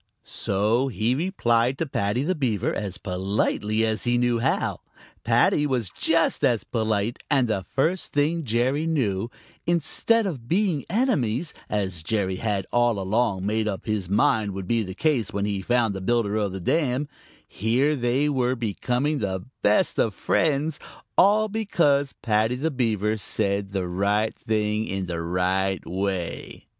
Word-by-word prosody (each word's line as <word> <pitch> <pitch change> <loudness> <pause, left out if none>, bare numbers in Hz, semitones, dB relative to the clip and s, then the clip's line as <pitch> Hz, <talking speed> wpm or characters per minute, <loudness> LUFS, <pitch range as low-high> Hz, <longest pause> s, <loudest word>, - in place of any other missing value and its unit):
So 110 +7 0
he 115 -1 0
replied 130 - +1
to 165 - -1
Paddy 115 -2 -1
the 180 +5 +1
Beaver 125 - -1
as 100 -4 -3
politely 105 +3 0
as 110 0 -1
he 120 0 +2
knew 120 -1 +2
how. 130 +4 0 0.4
Paddy 150 - +3
was 125 -9 -1
just 165 0 +1
as 120 -3 +2
polite, 110 0 -1
and 135 -4 +3
the 110 -4 -1
first 160 - -1
thing 155 +3 +1
Jerry 130 +6 0
knew, 115 -9 0 0.4
instead 175 +7 +2
of 135 -12 -5
being 180 - +1
enemies, 170 - 0 0.2
as 95 -5 -2
Jerry 95 0 -1
had 100 -3 -1
all 120 -2 +2
along 100 0 0
made 110 +1 0
up 100 -3 -4
his 105 -5 -2
mind 105 0 +2
would 95 -2 -5
be 115 +1 +2
the 95 -3 -5
case 130 -6 +1
when 100 0 -1
he 100 -2 -2
found 120 0 +1
the 95 - -5
builder 110 0 +1
of 105 -3 0
the 95 - -5
dam, 135 - 0 0.4
here 125 +8 +1
they 130 +3 +1
were 130 -3 +1
becoming 125 +6 -1
the 95 -3 -3 0.2
best 105 +1 +2
of 110 - +1
friends, 155 -1 0 0.4
all 210 +3 +5
because 165 -10 +1
Paddy 110 +1 +2
the 155 +6 -1
Beaver 110 -6 0
had 110 - -2
said 100 -1 0
the 95 -2 -2
right 100 +4 0
thing 110 0 -1
in 95 0 -3
the 85 -1 -4
right 90 +2 0
way. 95 -2 -4
115 Hz, 160 wpm, -25 LUFS, 100-140 Hz, 0.4 s, all